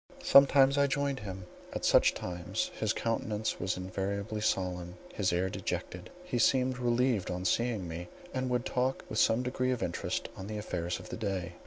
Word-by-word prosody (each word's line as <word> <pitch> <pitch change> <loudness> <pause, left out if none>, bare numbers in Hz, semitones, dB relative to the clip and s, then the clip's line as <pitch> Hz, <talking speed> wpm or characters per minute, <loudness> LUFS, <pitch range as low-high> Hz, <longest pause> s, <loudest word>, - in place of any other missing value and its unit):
Sometimes 140 0 +6
I 140 - +4
joined 140 -1 -1
him; 95 -3 -7 0.3
at - - -3
such - - +5
times 90 -1 -3
his - - 0
countenance 110 -2 -1
was 90 +1 -1
invariably 100 +3 -3
solemn, 90 -4 -1 0.2
his 100 -4 +1
air 90 +2 +1
dejected. 95 - -4
He 120 - -2
seemed 130 +1 +3
relieved 120 -3 +1
on 90 0 -3
seeing 110 -1 +1
me, 85 +1 -6 0.3
and 130 -1 -1
would 125 -1 0
talk 130 +1 -1
with 110 - -1
some 115 +2 +4
degree 125 0 -1
of 125 -2 0
interest - - -2
on 95 - -7
the 105 0 -4
affairs 85 -4 -3
of - - -11
the - - -5
day. 95 -5 -2
110 Hz, 180 wpm, -31 LUFS, 90-125 Hz, 0.3 s, Sometimes